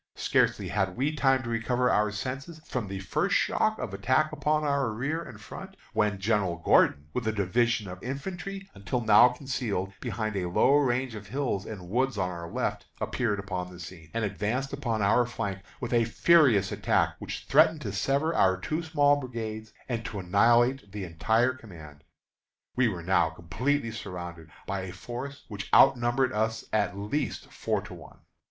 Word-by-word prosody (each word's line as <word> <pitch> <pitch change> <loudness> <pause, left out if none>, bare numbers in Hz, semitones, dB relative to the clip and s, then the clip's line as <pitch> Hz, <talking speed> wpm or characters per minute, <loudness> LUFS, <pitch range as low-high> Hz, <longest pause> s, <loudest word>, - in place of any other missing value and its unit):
Scarcely 95 -3 +1
had 95 -1 -1
we 145 +4 0
time 135 -2 +3
to 120 - -5
recover 125 +2 +1
our 105 0 +3
senses 135 +10 -5
from 120 -5 -3
the 95 0 -5
first 95 - 0
shock - - +2
of - - -5
attack 130 +10 +1
upon 155 0 0
our 140 -4 +1
rear 135 +9 -2
and - - -10
front, - - -10 0.2
when 105 -2 +1
General 95 -3 0
Gordon, 75 -3 +3
with 125 -3 -2
a - - +3
division 110 +2 +1
of 90 0 -8
infantry, 190 +9 -5
until 100 +5 -3
now 110 +2 +7
concealed 120 -7 -3
behind 110 -3 -3
a 90 -2 -1
low 125 +9 +4
range 130 -3 +1
of 105 -2 -8
hills 120 -4 -2
and 95 -5 -7
woods 130 +7 0
on 90 - 0
our 85 -1 -7
left, - - -3
appeared 115 -5 -1
upon 95 -2 -4
the 90 - -12
scene, 80 -2 -10
and 115 -1 -1
advanced 110 +7 -2
upon 115 -6 -1
our 110 +5 +4
flank 100 -5 -4 0.2
with - - -4
a 115 -1 +4
furious 120 - +4
attack, - - +1
which - - -6
threatened 155 +2 +4
to - - -4
sever 140 +4 0
our 95 - +3
two 155 - -2
small 145 -3 +3
brigades 110 -5 -5 0.2
and 115 -3 -2
to 105 - -5
annihilate 115 +5 +3
the 105 -1 -5
entire 110 +9 +1
command. 80 - -13 0.7
We 125 -1 +3
were 90 -6 -3
now 90 -2 +3
completely 115 - -1
surrounded 85 -6 -7 0.2
by 100 -1 -3
a 95 -1 -6
force 125 +8 -7
which 105 -1 -7
outnumbered 130 0 +4
us 110 0 -1
at 100 -2 +1
least 105 +9 -3
four - - -1
to - - -10
one. - - -13
115 Hz, 175 wpm, -28 LUFS, 95-130 Hz, 0.7 s, now